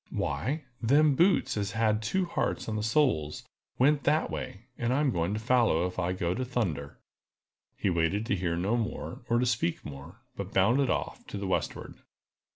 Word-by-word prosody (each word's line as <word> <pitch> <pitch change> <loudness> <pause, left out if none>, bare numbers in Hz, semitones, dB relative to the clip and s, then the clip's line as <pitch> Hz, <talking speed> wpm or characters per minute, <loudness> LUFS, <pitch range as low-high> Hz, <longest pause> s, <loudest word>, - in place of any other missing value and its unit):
"Why, 100 - -2 0.2
them 145 +5 +4
boots 165 -4 +3
as 105 0 -2
had 110 -1 +2
two 185 - 0
hearts 170 - -2
on 110 - -2
the 105 - -1
soles 110 - +1 0.3
went 145 +3 +3
that 155 +2 +2
way, 100 +5 -6
and 120 0 -1
I'm 140 +1 +2
going 85 +1 -1
to - - -2
follow 115 -7 +3
if 90 0 -4
I 90 0 0
go 90 -1 -1
to 130 - -2
thunder!" 85 - -2 0.8
He 95 - 0
waited 85 +5 +1
to 105 - +1
hear 85 -2 -1
no 100 +7 +1
more, 115 -2 -3
or 120 - +3
to 125 - +2
speak 115 -8 -1
more, 80 - -10
but 100 0 -6
bounded 120 +8 +4
off - - -3
to - - -6
the 100 - -4
westward. 95 - -2
110 Hz, 185 wpm, -29 LUFS, 90-125 Hz, 0.8 s, them